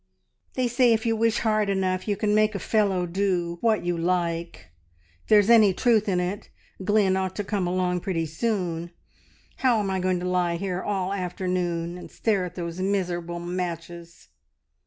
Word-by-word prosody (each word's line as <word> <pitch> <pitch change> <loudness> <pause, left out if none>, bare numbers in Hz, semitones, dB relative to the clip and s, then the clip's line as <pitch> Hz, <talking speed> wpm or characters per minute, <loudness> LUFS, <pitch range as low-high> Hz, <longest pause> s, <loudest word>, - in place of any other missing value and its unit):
"They 255 -1 +1
say 240 0 +4
if 220 0 -1
you 225 -1 +2
wish 230 +1 +1
hard 215 -2 +1
enough 185 -1 -1
you 205 -1 0
can 210 0 +1
make 215 0 +3
a - - -2
fellow 195 -2 +1
do 175 -2 -1
what 220 -5 +1
you 175 0 0
like. 170 - -2 0.5
If - - -29
there's 210 0 +5
any 215 -5 +6
truth 220 -3 +2
in 180 -2 +1
it, 180 +3 -3 0.3
Glynn 205 -1 +3
ought 190 -1 -2
to 205 - -2
come 195 -3 -1
along 180 0 0
pretty 170 -3 -2
soon. 170 -1 -2 0.7
How 245 -4 +3
am 200 -2 -1
I 190 - -1
going 185 -1 0
to 180 - -3
lie 180 -1 +1
here 180 0 -3
all 195 -2 -2
afternoon 180 -2 -2
and - - -10
stare 205 -5 0
at 180 0 -8
those 170 0 -5
miserable 180 -3 -1
matches? 170 - -6
185 Hz, 180 wpm, -25 LUFS, 175-210 Hz, 0.7 s, any